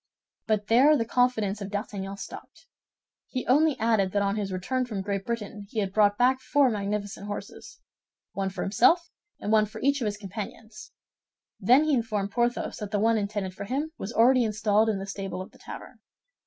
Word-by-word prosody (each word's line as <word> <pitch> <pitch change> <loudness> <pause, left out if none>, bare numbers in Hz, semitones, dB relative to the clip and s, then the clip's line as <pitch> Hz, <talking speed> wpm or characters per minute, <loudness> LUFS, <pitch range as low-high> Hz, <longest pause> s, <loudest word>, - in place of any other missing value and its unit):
But 215 -2 +1
there 270 +8 +5
the 230 - 0
confidence 220 -4 +1
of 200 - -5
D'Artagnan 200 -1 -4
stopped. - - -10 0.6
He 255 -2 -4
only 295 +3 +3
added 215 -4 +2
that 205 0 +2
on 200 0 0
his 205 -2 -3
return 225 +8 -1
from 215 -6 -4
Great 200 +1 -3
Britain 210 -3 -4
he 225 - -9
had 195 -2 -2
brought 205 -1 +4
back 255 +1 +3
four 280 -2 +3
magnificent 205 -1 -3
horses—one 200 -1 -8
for 190 - -5
himself, 335 - +3 0.3
and 210 - -3
one 215 -1 +4
for 220 +1 -9
each 280 0 +2
of - - 0
his 210 -1 -2
companions; 215 +2 -8 0.7
then 255 +5 +5
he 310 -1 +1
informed 215 -5 -1
Porthos 240 +2 -1
that 210 -2 -5
the 205 - 0
one 225 +1 +3
intended 200 -2 -3
for 200 +2 -7
him 280 +8 -2
was 195 - -5
already 245 +2 +5
installed 215 0 +2
in 210 - 0
the 195 - -5
stable 195 -1 -5
of 185 - -7
the - - -20
tavern. - - -10
215 Hz, 190 wpm, -27 LUFS, 200-240 Hz, 0.7 s, there